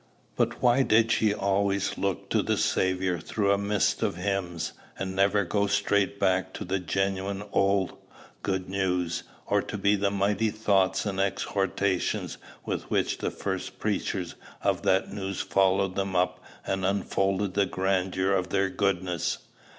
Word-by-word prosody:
But - - 0
why 125 +2 +5
did 115 -2 +4
she 110 -1 +3
always 100 -1 0
look 100 -2 -2
to - - +3
the - - 0
Saviour 95 -1 +1
through 100 +5 0
a 100 - +4
mist 100 0 +1
of - - 0
hymns, 90 -4 -2 0.2
and 95 0 -4
never 100 +1 +3
go 100 +3 +1
straight 100 0 +1
back 95 -1 +1
to - - -5
the 95 +2 -1
genuine 95 +2 -1
old 100 -1 +2 0.5
good 95 -2 -2
news, 90 -3 -1 0.2
or - - +2
to - - -5
the 100 -1 +2
mighty 100 +2 +1
thoughts 100 -3 +1
and 95 -2 -2
exhortations 95 -1 -1 0.3
with - - -3
which - - 0
the - - -1
first 95 -1 -4
preachers 95 -4 -2 0.3
of - - +1
that 95 +1 +1
news 95 -2 -3
followed 95 0 +2
them 95 -1 -2
up 90 +1 +1 0.2
and 95 -1 -1
unfolded 95 0 0
the 100 0 +2
grandeur 95 0 0
of 95 -1 0
their 95 0 +1
goodness? 90 -4 0
95 Hz, 150 wpm, -27 LUFS, 95-100 Hz, 0.5 s, why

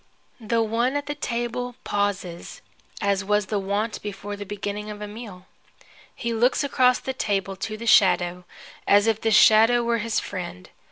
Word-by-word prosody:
The 230 0 0
one 235 +5 0
at 290 0 -2
the 290 - -3
table 245 -2 -3
pauses, 200 -4 -3 0.4
as 200 -1 +1
was 210 +1 +1
the 205 +1 -2
wont 205 +3 -2
before 205 0 -6
the 205 -1 -8
beginning 205 +1 -5
of 210 -1 -7
a 210 - -6
meal. 205 -4 -10 0.7
He 235 -1 -3
looks 240 +5 +2
across 255 -3 +3
the 265 - -4
table 195 -5 -2
to 215 +3 -5
the 230 - -7
shadow, 180 -4 +3 0.4
as 205 +1 +5
if 225 -1 +1
the 225 - +1
shadow 225 +3 +6
were 235 0 0
his 225 0 -1
friend. 185 -1 -7
210 Hz, 170 wpm, -24 LUFS, 200-235 Hz, 0.7 s, shadow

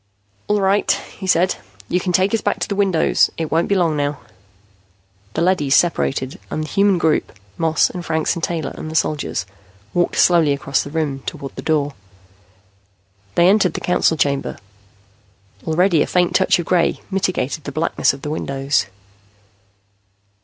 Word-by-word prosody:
"All 210 0 +2
right," 195 +1 +2 0.3
he 190 - -5
said. 185 0 +2 0.3
"You 180 - +1
can 180 0 -2
take 185 +4 +2
us 225 - +1
back - - 0
to - - 0
the - - -2
windows. 195 -5 +2
It 160 -2 -3
won't 165 +2 +2
be 200 - +1
long 170 -4 +2
now." 145 0 -1 1.2
The 165 - +1
leadys 150 -7 +2
separated, 135 -6 0
and 155 - -3
the - - -6
human 200 -1 +3
group, 160 -2 +1 0.2
Moss 160 -1 +2
and 180 - -7
Franks 160 -2 0
and 170 - -6
Taylor 160 -5 -2
and 155 - -7
the 160 - -7
soldiers, 150 -11 -1 0.5
walked 175 0 +1
slowly 165 -5 +4
across 140 -1 -1
the - - -7
room, 145 -3 -2
toward 135 - -6
the - - -6
door. 145 -3 0 1.4
They 170 - +5
entered 195 -1 +3
the - - -2
Council 180 -2 +1
Chamber. 140 -2 -1 1.1
Already 165 0 +3
a - - +1
faint 180 -1 +1
touch - - +3
of 175 - -3
gray 175 -1 +1
mitigated 175 -6 -1
the 140 - -4
blackness 155 +4 +1
of 135 0 -11
the 150 - -3
windows. 140 -4 -1
165 Hz, 165 wpm, -19 LUFS, 145-180 Hz, 1.4 s, They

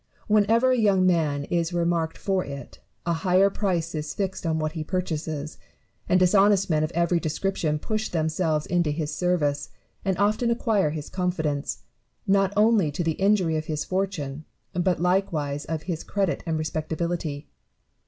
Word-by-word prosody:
Whenever 220 +4 +4
a 255 - +2
young 195 -4 +4
man 155 -6 +2
is 170 +3 -1
remarked 170 -1 0
for 190 -2 0
it, 140 0 -9 0.3
a 170 - +1
higher 190 +1 +4
price 175 -5 -1
is 155 -1 -4
fixed 190 -3 -2
on 160 -1 +1
what 155 -1 -1
he 160 -1 -4
purchases; 155 -3 -3 0.5
and 185 - +5
dishonest 195 +1 +4
men 155 -1 +2
of 155 - 0
every 170 0 +2
description 165 -1 -1
push 215 +7 -2
themselves 160 -1 0
into 175 -3 +1
his 150 0 -2
service, 150 -6 0 0.3
and 190 -2 0
often 210 +4 +2
acquire 220 - +2
his 150 -1 -5
confidence, 160 -6 -2 0.4
not 195 -1 +3
only 210 -6 +4
to 150 +4 -2
the 165 - +1
injury 190 -5 +3
of 155 - -3
his 155 -1 -3
fortune, 165 -7 -2 0.3
but 180 0 +1
likewise 165 -6 0
of 160 -1 -3
his 170 -4 -4
credit 195 -3 -1
and 160 -1 0
respectability. 155 -1 -3
170 Hz, 160 wpm, -25 LUFS, 155-195 Hz, 0.5 s, and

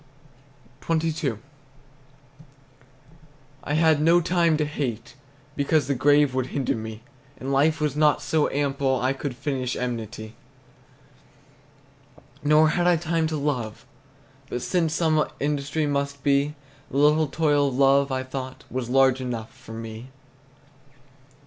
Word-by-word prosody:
XXII. 160 -4 0 2.3
I 145 - -2
had 160 -1 +3
no 165 +3 +5
time 170 -2 +2
to 150 - 0
hate, 130 -6 -4 0.4
because 145 0 +1
The 140 - 0
grave 145 +1 +3
would 130 -1 -1
hinder 135 -2 -1
me, 110 0 -7 0.3
And 135 +2 -4
life 155 +4 +3
was 150 -1 -1
not 150 -1 +3
so 155 -2 +1
ample 140 -2 0
I 130 +2 +1
Could 135 -1 -5
finish 130 -2 -3
enmity. 115 -3 -5 2.1
Nor 150 +1 +5
had 175 +3 +1
I 175 - +5
time 165 0 0
to 155 -1 -2
love; 125 -7 -3 0.6
but 125 - -4
since 165 -3 0
Some 155 -2 +2 0.2
industry 145 +2 -1
must 140 -1 -2
be, 140 +1 +2 0.3
The - - -4
little 150 +2 +4
toil 145 -1 +2
of 135 - -3
love, 140 0 +4
I 130 0 -1
thought, 130 0 -7
Was 125 -2 -3
large 135 0 +3
enough 120 -3 -5
for 130 -3 -12
me. 115 +2 -8
140 Hz, 130 wpm, -24 LUFS, 130-155 Hz, 2.3 s, no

